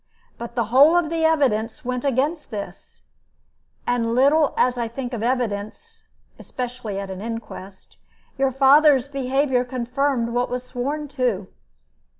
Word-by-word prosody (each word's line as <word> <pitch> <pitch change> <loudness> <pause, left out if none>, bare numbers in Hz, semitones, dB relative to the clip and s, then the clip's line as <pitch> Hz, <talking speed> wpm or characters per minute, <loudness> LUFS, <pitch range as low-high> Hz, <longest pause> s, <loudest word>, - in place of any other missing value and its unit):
But 235 0 -7
the 235 - +1
whole 295 +6 +7
of 335 -2 0
the 325 -1 +1
evidence 255 -9 +1
went 250 0 -2
against 285 +4 -1
this, 210 -4 -9 0.8
and 230 -1 0
little 285 +4 +3
as 250 0 +3
I 235 -1 -2
think 245 +2 -6
of 230 - -3
evidence, 245 - -3 0.3
especially 245 -5 -5
at 195 -1 -6
an 190 0 -7
inquest, 215 -4 -8 0.4
your 270 0 +1
father's 275 0 +5
behavior 270 -1 0
confirmed 250 0 -1
what 245 +1 -1
was 250 0 -3
sworn 280 +5 -3
to. 245 -9 -1
250 Hz, 140 wpm, -22 LUFS, 235-280 Hz, 0.8 s, whole